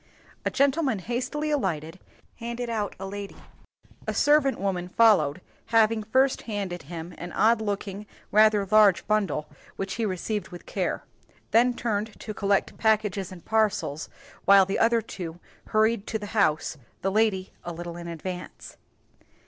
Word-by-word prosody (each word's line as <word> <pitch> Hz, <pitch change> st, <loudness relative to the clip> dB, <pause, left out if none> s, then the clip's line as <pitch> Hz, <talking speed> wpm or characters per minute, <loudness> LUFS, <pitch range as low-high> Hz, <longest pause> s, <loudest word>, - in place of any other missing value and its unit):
A -, -, +3 dB
gentleman 275 Hz, -3 st, +2 dB
hastily 250 Hz, -, -2 dB
alighted, 175 Hz, -, -2 dB, 0.4 s
handed 235 Hz, 0 st, -4 dB
out 210 Hz, -3 st, -2 dB
a 195 Hz, -, -5 dB
lady; 200 Hz, 0 st, -6 dB, 0.7 s
a -, -, -1 dB
servant 290 Hz, -2 st, +3 dB
woman 185 Hz, -2 st, -1 dB
followed 185 Hz, -8 st, +4 dB, 0.3 s
having 225 Hz, -1 st, +3 dB
first 260 Hz, +5 st, +2 dB
handed 195 Hz, -5 st, -3 dB
him 165 Hz, +4 st, -8 dB
an 175 Hz, 0 st, -6 dB
odd 225 Hz, 0 st, +3 dB
looking, 205 Hz, -1 st, -4 dB, 0.2 s
rather 215 Hz, -1 st, +5 dB
large 210 Hz, -3 st, +6 dB
bundle, 195 Hz, -8 st, 0 dB, 0.3 s
which 195 Hz, 0 st, -3 dB
he -, -, +1 dB
received 205 Hz, +3 st, -3 dB
with 175 Hz, -1 st, -11 dB
care -, -, -2 dB, 0.5 s
then 240 Hz, +2 st, +4 dB
turned 220 Hz, -2 st, -2 dB
to 215 Hz, -, -6 dB
collect 200 Hz, -1 st, 0 dB
packages 210 Hz, -4 st, +1 dB
and 180 Hz, -2 st, -11 dB
parcels, 210 Hz, -9 st, 0 dB, 0.4 s
while 195 Hz, -1 st, +7 dB
the 195 Hz, -, -2 dB
other 230 Hz, 0 st, +3 dB
two 175 Hz, -5 st, -7 dB, 0.3 s
hurried 220 Hz, -1 st, +2 dB
to 220 Hz, -, -1 dB
the 210 Hz, -, -7 dB
house, 160 Hz, -7 st, +1 dB, 0.3 s
the 195 Hz, -, +1 dB
lady 205 Hz, -3 st, +1 dB
a 175 Hz, -, -5 dB
little 170 Hz, 0 st, -6 dB
in 170 Hz, 0 st, -7 dB
advance. 180 Hz, +2 st, -7 dB
205 Hz, 150 wpm, -26 LUFS, 185-225 Hz, 0.7 s, while